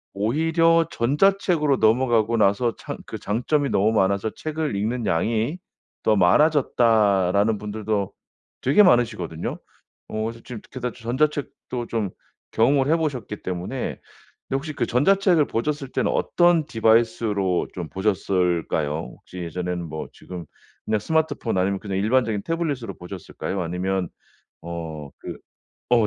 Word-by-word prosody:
오히려 165 +9 +3
"전자책으로 150 +2 +2
넘어가고 115 0 +3
나서 110 +3 +2
창 - - -6
그 - - -5
장점이 140 +7 0
너무 105 +3 +3
많아서 100 +1 +2
책을 155 -6 -3
읽는 110 +4 -1
양이 110 - 0 0.5
더 110 - +4
많아졌다."라는 105 - +3
분들도 105 -1 -3 0.5
되게 145 +11 +5
많으시거든요. 110 - +1 0.5
어 110 0 -2
그래서 115 +1 -5 0.3
게다 125 -2 -3
지금 115 0 -9
전자책도 145 -5 -1
좀 110 -4 -1 0.4
경험을 135 +4 +3
해 165 - +4
보셨기 130 -10 -3
때문에 90 +8 -4 0.7
근데 135 - -1
혹시 155 +2 -5
그 - - -1
전자책을 175 - +3
보셨을 140 +3 -2
때는 - - 0
어떤 175 -3 +3
디바이스로 110 - +2
좀 85 -4 -5
보셨을까요? 90 -6 0
혹시 90 - -11
예전에는 90 +1 -3
뭐 80 - -5
지금 90 -3 -9 0.4
그냥 110 -1 +1
스마트폰 160 -5 0
아니면 95 +1 +1
그냥 100 -2 -4
일반적인 110 -1 +1
태블릿으로 160 -8 -2
보셨을까요 95 +1 -5
아니면 90 +2 -1 0.5
어 80 -4 -6
그 - - -7 0.5
어 115 -3 +5
110 Hz, 320 characters per minute, -23 LUFS, 95-140 Hz, 0.7 s, 되게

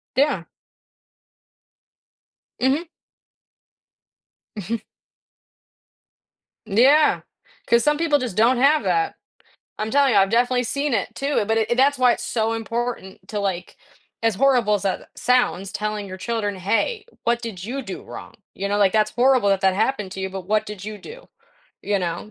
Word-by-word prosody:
Yeah. 270 - +2 2.2
Mhm. 285 +6 +1 1.7
Mhm. 215 +3 -3 1.9
Yeah, 260 +9 +4 0.5
'cause 235 0 +4
some 295 0 +2
people, 310 -3 +2
just, 240 -7 -4
don't 240 +3 +4
have 290 +4 +4
that. 410 -1 0 0.6
I'm 215 +1 -3
telling 280 -2 +4
you, - - +5
I've 195 0 +3
definitely 245 +2 +2
seen 280 +3 -1
it 220 +2 -1
too, 275 -4 0
but 225 +1 +1
i 220 - +2
that's 275 +2 +3
why 250 -1 +5
it's 240 - -6
so 225 -2 -1
important 230 -3 -4
to, 210 - -3
like 185 -3 -3 0.4
as 225 -3 +1
horrible 245 -4 +3
as 205 - +1
that 195 -2 -1
a - - -17
sounds, 245 -6 +1
telling 210 0 -3
your 185 -1 -8
children, 205 -2 -2
"Hey, 225 - -1 0.2
what 235 0 +1
did 200 -6 -7
you 265 +5 -4
do - - -7
wrong," - - -10 0.2
you 200 +1 -3
know, 205 - +1
like, 195 -2 +4
"That's 215 -1 +2
horrible 250 -2 +3
that 195 0 +1
that 190 -1 +3
happened 210 -3 -1
to 190 - -7
you, 190 - -2
but 190 0 -6
what 215 0 +1
did 205 -2 -8
you 215 -1 -6
do?" - - -12 0.6
you 205 -1 0
know, 175 +4 -4
225 Hz, 160 wpm, -22 LUFS, 200-260 Hz, 2.2 s, you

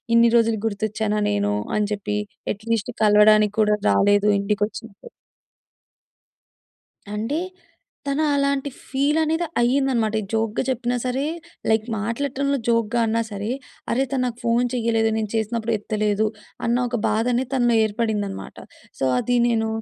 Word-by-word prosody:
ఇన్ని 235 0 +6
రోజులు 225 -2 +2
గుర్తొచ్చానా? 215 0 -2
నేను 100 0 0 0.3
అని 210 -1 +1
చెప్పి 205 0 -3 0.3
యట్ 210 +2 -7
లీస్ట్ 230 +2 0
కలవడానికి 210 0 +5
కూడా 210 0 +3
రాలేదు 205 +1 +4
ఇంటికి 205 +1 0
వచ్చినప్పుడు. 220 - -11 2.1
అంటే, 240 +10 -1 0.7
తను 280 +3 +1
అలాంటి 280 0 0 0.2
ఫీల్ 280 +3 +1
అనేది 320 +2 0
అయిందనమాట. 245 -3 +2
ఈ - - -6
జోక్‌గా 225 +1 0
చెప్పినా 250 -1 -1
సరే 255 +2 -1 0.5
లైక్ 220 0 +2
మాట్లాడటంలో 280 +5 -1
జోక్‌గా 230 0 +1
అన్నా 230 +1 +1
సరే, 205 +3 -3 0.4
అరే! 260 +3 +2
తను 265 -2 0
నాకు 240 -1 -3
ఫోన్ 235 +1 +2
చెయ్యలేదు 225 -2 +1
నేను 215 -2 -2
చేసినప్పుడు 225 +1 -1
ఎత్తలేదు 210 0 0 0.4
అన్న 235 - +2
ఒక 240 - -3
బాధ 220 +1 +1
అనేది 255 +1 -1
తనలో 240 -2 +3
ఏర్పడిందనమాట. 210 -2 -2 0.4
సో 135 - +1
అది 245 - 0
నేను 225 -1 +1
225 Hz, 135 wpm, -22 LUFS, 210-245 Hz, 2.1 s, ఇన్ని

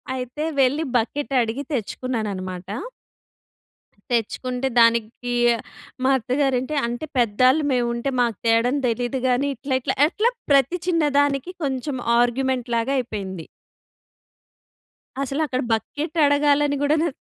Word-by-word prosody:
అయితే, 255 +4 -4 0.2
వెళ్ళి 270 +4 +3
బకెట్ 275 +5 -1
అడిగి 235 +4 -2
తెచ్చుకున్నాననమాట. 200 -7 -4 1.4
తెచ్చుకుంటే, 250 +3 -1
దానికి 230 +1 +2 0.7
మా 265 - +4
అత్తగారు 265 +2 0
అంటే, 300 +4 -4
అంటే 240 +6 -4
పెద్దళ్ళు 255 +6 +3
మేముంటే, 240 +1 0
మాకు 235 -4 0
తేవడం 230 +4 +3
తెలీదు 245 +2 -1
గాని, 255 +3 +1
ఇట్లా, 265 +2 -2
ఇట్లా, - - -1
అట్లా 445 +8 +1 0.2
ప్రతి 275 +6 +3
చిన్న 330 -3 +2 0.2
దానికి 285 +4 0
కొంచెం 265 +1 -2 0.3
ఆర్గ్యుమెంట్‌ 250 0 0
లాగ 230 +2 -1
అయిపోయింది. 195 -9 -4 1.8
అసలు 275 +3 -2
అక్కడ 255 -1 -1
బకెట్ 295 +8 -3
అడగాలని 285 0 +3
కూడా, 290 +2 +3
నా - - +2
255 Hz, 115 wpm, -22 LUFS, 235-285 Hz, 1.8 s, మా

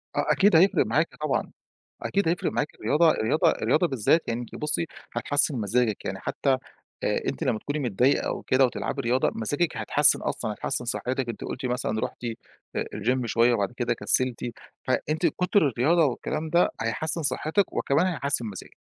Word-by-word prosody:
آه - - +1
أكيد 200 -2 +4
هيفرِق 185 +5 +5
معاكِ - - 0
طبعًا، - - -1 0.5
أكيد 200 -4 0
هيفرِق 175 +2 0
معاكِ 150 - -2
الرياضة 160 +2 +3
الرياضة 115 +3 +2
الرياضة 175 +3 +1
بالذات 135 +4 +1
يعني 115 +1 -1
أنتِ 120 - -9
بُصّي، 150 +2 -1 0.3
هتحسِّن 145 -1 +1
مزاجِك، 110 +1 0
يعني - - -4
حتى، 140 - -1 0.5
آآ، - - 0
أنتِ - - -3
لمّا 110 - 0
تكوني 145 +6 -4
متضايقة 125 0 +1
أو - - -3
كده 130 +1 +3
وتلعبي 125 - -2
رياضة 125 +2 +1
مزاجِك 145 +10 -1
هيتحسّن - - +4
أصلًا، - - -2
هيتحسّن 125 +4 -3
صحّتِك، 125 +1 -2
أنتِ 115 - -6
قُلتِ 130 - -4
مثلًا 120 -3 -1
رُحتِ، 120 - -5 0.5
آآ، - - 0
الgym 125 +4 0
شوية 115 +2 +3
وبَعد 100 -1 -1
كده 120 -1 -1
كسّلتِ 130 +1 0 0.4
فأنتِ 155 +6 0
كُتر 180 -1 +2
الرياضة 150 +8 +3
والكلام 155 +4 -3
ده 175 +2 +4
هيحسِّن 155 +9 -2
صحّتِك 160 +6 0
وكمان 150 +6 +1
هيحسّن 140 -8 -1
مزاجِك. 100 -4 -9
130 Hz, 170 wpm, -26 LUFS, 120-160 Hz, 0.5 s, هيفرِق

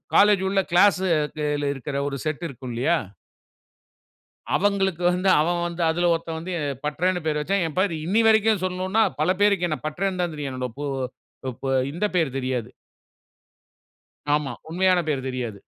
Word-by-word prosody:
College 205 -1 +6
உள்ள 195 0 +1
கிளாஸ்‌ல 155 -6 +2
இருக்குற 140 +1 -6
ஒரு 140 - -3
செட் 155 +2 -2
இருக்கும் 130 -2 -8
இல்லையா? 150 +8 +2 1.6
அவுங்களுக்கு 190 -3 +1
வந்து 185 +2 0
அவன் 175 +3 +1
வந்து 170 0 -4
அதுல 175 +1 +2
ஒருத்தன் 165 -1 -4
வந்து 175 +3 -6 0.3
பட்றன்னு 180 +4 0
பெயர் 150 -1 0
வச்சான். 190 +5 0
ஏன் 155 - -7
பேர் 185 -1 +2
இன்னைய 215 +7 +2
வரைக்கும் 220 -3 +4
சொன்னோன்னா 185 +4 0 0.2
பல - - +3
பேருக்கு 200 -4 +3
என்ன 155 - -1
பட்றன்னு 185 +4 -2
தான் 170 -3 -2
தெரியும். 145 -2 -4
என்னுடைய 125 -2 -4
பொ 145 - -4 0.9
அ - - +2 0.2
இந்த 175 +7 0
பெயர் 155 -7 +1
தெரியாது. 130 -3 -2 1.6
ஆமா. 150 -3 -1 0.2
உண்மையான 180 +2 +3
பேரு 140 -3 0
தெரியாது. 120 -6 -4
170 Hz, 150 wpm, -24 LUFS, 150-185 Hz, 1.6 s, College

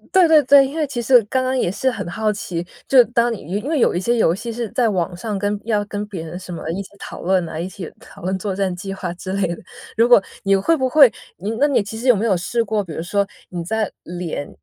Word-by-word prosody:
对 375 -2 +7
对 315 -2 +7
对， 275 +1 +7
因 280 +4 -6
为 305 -3 0
其 240 -3 -3
实 245 +1 +6
刚 255 +5 0
刚 260 +1 0
也 - - +1
是 215 +8 0
很 200 -7 -5
好 215 +3 0
奇， 175 -4 -4 0.2
就 270 - +3
是 250 - +10
当 235 +1 +1
你 220 - -6 0.2
因 210 - -6
为 320 - +1
有 - - +3
一 175 - 0
些 235 +5 +1
游 220 -8 +3
戏 225 +6 -6
是 230 -1 -4
在 240 +1 +1
网 185 -4 -1
上 210 +1 -3
跟 205 +1 -1
要 215 -3 +1
跟 205 0 -5
别 190 -6 -6
人 175 +3 -7
什 185 -1 -8
么 160 - -6
一 190 +4 -3
起 190 - -9
讨 - - -8
论 185 0 +2
呐， 160 -1 -6
一 170 - -3
起 185 -2 -8
讨 - - -15
论 190 +2 -2
作 195 -1 -3
战 195 -2 0
计 195 +2 -6
划 180 -3 -4
之 185 +1 -6
类 200 -1 +1
的。 - - -10 0.4
如 230 +1 +5
果 240 -5 +6 0.2
你 195 0 +3
会 320 +13 +2
不 260 -2 +1
会， 275 -2 +7 0.2
你 200 +5 -4
那 290 - +4
你 275 -7 +2
其 205 +2 -7
实 240 +4 -4
有 250 - +7
没 210 +3 -1
有 205 -4 +3
试 230 +7 -1
过， 215 -1 -1
比 170 -5 -8
如 160 - -4
说 200 +3 0 0.2
你 175 -2 -4
在 215 +4 -2
连 175 -4 -5
205 Hz, 305 characters per minute, -20 LUFS, 185-240 Hz, 0.4 s, 是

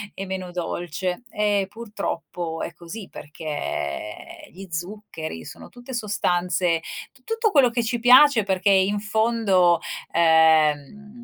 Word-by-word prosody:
E 195 - -5
meno 185 -1 -5
dolce. 175 +3 -4
E 205 -2 +1
purtroppo 175 -6 -5
è 170 - -5
così, 180 +5 -9
perché 145 - -6
gli 190 +2 -11
zuccheri 165 - -6
sono - - -11
tutte 245 +1 -11
sostanze 180 -5 0 0.3
t 260 -3 -25
tutto 450 -1 0
quello 275 -7 +5
che 235 0 0
ci 240 +1 -2
piace, 250 -1 +7
perché 190 0 +1
in 195 +1 +3
fondo, 205 -5 +2 0.3
ehm, 160 - +3
190 Hz, 125 wpm, -23 LUFS, 165-220 Hz, 0.3 s, piace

